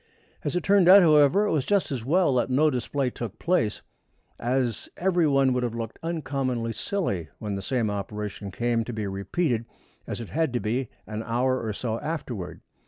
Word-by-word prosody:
As -, -, -2 dB
it 180 Hz, -, 0 dB
turned 195 Hz, -3 st, +5 dB
out, 195 Hz, 0 st, +10 dB
however, 155 Hz, +5 st, +5 dB
it -, -, 0 dB
was 150 Hz, -4 st, +1 dB
just 200 Hz, -2 st, +1 dB
as 125 Hz, -5 st, -3 dB
well 165 Hz, +3 st, +3 dB
that 125 Hz, 0 st, +1 dB
no 150 Hz, +4 st, +3 dB
display 130 Hz, +1 st, -1 dB
took 110 Hz, -4 st, -6 dB
place, 165 Hz, -12 st, 0 dB, 0.6 s
as 120 Hz, -2 st, -1 dB
every 175 Hz, -3 st, +2 dB
one 135 Hz, -2 st, +3 dB
would 125 Hz, -, 0 dB
have 120 Hz, -2 st, -2 dB
looked 115 Hz, -1 st, -5 dB
uncommonly 135 Hz, -8 st, -2 dB
silly 100 Hz, -, -2 dB
when 105 Hz, -2 st, -4 dB
the 100 Hz, -, -3 dB
same 115 Hz, 0 st, 0 dB
operation 100 Hz, 0 st, -5 dB
came 120 Hz, +3 st, 0 dB
to 120 Hz, -, -5 dB
be 110 Hz, -1 st, -3 dB
repeated, 115 Hz, -, -1 dB, 0.4 s
as -, -, -4 dB
it 115 Hz, -, -7 dB
had 160 Hz, -4 st, 0 dB
to 120 Hz, -, +1 dB
be, 120 Hz, +4 st, -1 dB, 0.2 s
an 110 Hz, 0 st, -5 dB
hour 125 Hz, +3 st, 0 dB
or 110 Hz, -, -2 dB
so 115 Hz, +2 st, -3 dB
afterward. 130 Hz, -, -5 dB
125 Hz, 190 wpm, -26 LUFS, 110-155 Hz, 0.6 s, out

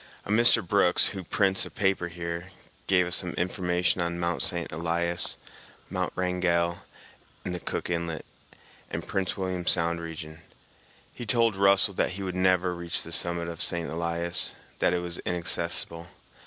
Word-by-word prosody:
A -, -, -4 dB
Mr. 115 Hz, -4 st, +5 dB
Brooks, 90 Hz, -2 st, +3 dB
who 95 Hz, -2 st, -6 dB
prints 95 Hz, +2 st, +2 dB
a -, -, -4 dB
paper 95 Hz, -3 st, 0 dB
here, 85 Hz, +1 st, -6 dB, 0.4 s
gave 90 Hz, -2 st, +3 dB
us 90 Hz, 0 st, +6 dB
some 90 Hz, -, -1 dB
information 90 Hz, 0 st, 0 dB
on 85 Hz, 0 st, -2 dB
Mt. 85 Hz, -1 st, 0 dB
St. 85 Hz, -1 st, 0 dB
Elias, 85 Hz, +2 st, 0 dB, 0.5 s
Mt. -, -, -2 dB
Wrangell, 90 Hz, -1 st, 0 dB, 0.7 s
and 90 Hz, -, -2 dB
the 90 Hz, -, -3 dB
Cook -, -, -4 dB
Inlet 85 Hz, -2 st, -3 dB, 0.6 s
and -, -, -4 dB
Prince 95 Hz, -1 st, -2 dB
William 95 Hz, -2 st, -3 dB
Sound 85 Hz, -1 st, +2 dB
region. 80 Hz, -1 st, -8 dB, 0.7 s
He 120 Hz, -, -8 dB
told 115 Hz, -1 st, +3 dB
Russell 100 Hz, +1 st, +4 dB
that -, -, 0 dB
he 100 Hz, +1 st, -6 dB
would 90 Hz, -1 st, -4 dB
never 90 Hz, -1 st, +2 dB
reach 85 Hz, -1 st, -2 dB
the 85 Hz, -, -8 dB
summit 85 Hz, 0 st, +2 dB
of 85 Hz, -1 st, -5 dB
St. 85 Hz, -1 st, +1 dB
Elias, 85 Hz, +1 st, 0 dB, 0.2 s
that -, -, +2 dB
it 90 Hz, -, 0 dB
was 85 Hz, 0 st, -3 dB
inaccessible. 85 Hz, -1 st, -1 dB
85 Hz, 160 wpm, -27 LUFS, 85-95 Hz, 0.7 s, us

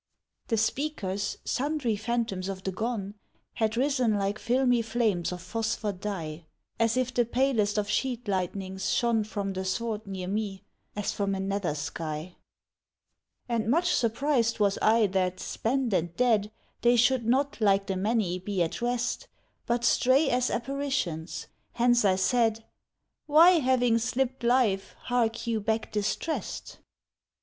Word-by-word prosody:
The 225 Hz, -, +1 dB
speakers, 215 Hz, -5 st, -1 dB
sundry 275 Hz, -4 st, 0 dB
phantoms 220 Hz, -4 st, -2 dB
of 190 Hz, -1 st, -6 dB
the 190 Hz, -, -2 dB
gone, 205 Hz, -1 st, -3 dB, 0.4 s
Had 220 Hz, 0 st, 0 dB
risen 255 Hz, -4 st, +2 dB
like 200 Hz, +1 st, -1 dB
filmy 245 Hz, -1 st, +2 dB
flames 220 Hz, -7 st, 0 dB
of 180 Hz, -1 st, -6 dB
phosphor 220 Hz, +1 st, -2 dB
dye, 170 Hz, -5 st, -5 dB, 0.3 s
As 230 Hz, +1 st, +2 dB
if 255 Hz, 0 st, 0 dB
the 240 Hz, -, +3 dB
palest 235 Hz, -4 st, +1 dB
of 210 Hz, -1 st, 0 dB
sheet 245 Hz, +1 st, -1 dB
lightnings 190 Hz, 0 st, -2 dB
shone 235 Hz, -2 st, +2 dB
From 205 Hz, -2 st, -4 dB
the 190 Hz, 0 st, -3 dB
sward 215 Hz, +2 st, -3 dB
near 190 Hz, -2 st, -5 dB
me, 200 Hz, -1 st, -3 dB, 0.3 s
as 205 Hz, -1 st, -1 dB
from 200 Hz, -1 st, -1 dB
a -, -, -4 dB
nether 195 Hz, -5 st, -1 dB
sky. 155 Hz, +3 st, -5 dB, 1.1 s
And 230 Hz, -2 st, -1 dB
much 345 Hz, +7 st, +3 dB
surprised 235 Hz, 0 st, +1 dB
was 200 Hz, -1 st, +2 dB
I 225 Hz, 0 st, +4 dB
that, 185 Hz, -2 st, 0 dB
spent 250 Hz, -1 st, -1 dB
and 170 Hz, -1 st, 0 dB
dead, 225 Hz, -4 st, +2 dB, 0.3 s
They 240 Hz, 0 st, +5 dB
should 240 Hz, 0 st, +3 dB
not, 270 Hz, +1 st, +1 dB
like 195 Hz, -1 st, +3 dB
the 195 Hz, -, -2 dB
many, 195 Hz, -2 st, 0 dB
be 190 Hz, -1 st, -1 dB
at 165 Hz, -, -4 dB
rest, 245 Hz, -, -1 dB, 0.4 s
But 235 Hz, 0 st, 0 dB
stray 270 Hz, +5 st, +4 dB
as 250 Hz, 0 st, +1 dB
apparitions; 240 Hz, -, -2 dB, 0.3 s
hence 240 Hz, 0 st, +3 dB
I 190 Hz, -2 st, +4 dB
said, 225 Hz, +2 st, +1 dB, 0.6 s
"Why, 330 Hz, +4 st, +7 dB
having 245 Hz, -4 st, +3 dB
slipped 255 Hz, +2 st, -1 dB
life, 235 Hz, -6 st, +2 dB
hark 235 Hz, -2 st, 0 dB
you 230 Hz, -2 st, 0 dB
back 220 Hz, +1 st, -1 dB
distressed? 210 Hz, +10 st, -3 dB
225 Hz, 145 wpm, -28 LUFS, 195-245 Hz, 1.1 s, Why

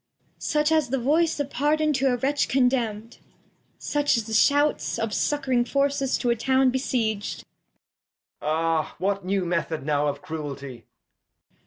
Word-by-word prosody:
Cord. -, -, -32 dB
Such 300 Hz, +1 st, +1 dB
as 310 Hz, -6 st, +2 dB
a 270 Hz, -, +1 dB
Voice 305 Hz, +6 st, +1 dB
of 285 Hz, -1 st, -3 dB
Pardon 305 Hz, +2 st, +1 dB
to 270 Hz, -1 st, +2 dB
a -, -, +2 dB
Wretch 280 Hz, +3 st, 0 dB
con 260 Hz, -1 st, +3 dB
demn'd; 230 Hz, -3 st, -3 dB, 0.6 s
Such 290 Hz, -3 st, +1 dB
as 230 Hz, -, -1 dB
the 220 Hz, +1 st, -7 dB
Shouts 290 Hz, +6 st, +2 dB
Of 225 Hz, -1 st, -2 dB
succ'ring 260 Hz, 0 st, +1 dB
Forces 275 Hz, -1 st, +1 dB
to 245 Hz, -, 0 dB
a -, -, +2 dB
Town 260 Hz, +2 st, +2 dB
besieg'd. 230 Hz, -5 st, -2 dB, 1.0 s
Edg. -, -, -5 dB
Ahl 160 Hz, 0 st, 0 dB
What 195 Hz, +2 st, -1 dB
new 190 Hz, 0 st, -1 dB
Method 165 Hz, -4 st, -2 dB
now 150 Hz, 0 st, +1 dB
of 145 Hz, 0 st, -3 dB
Cruelty! 140 Hz, -6 st, -7 dB
245 Hz, 160 wpm, -25 LUFS, 185-280 Hz, 1.0 s, con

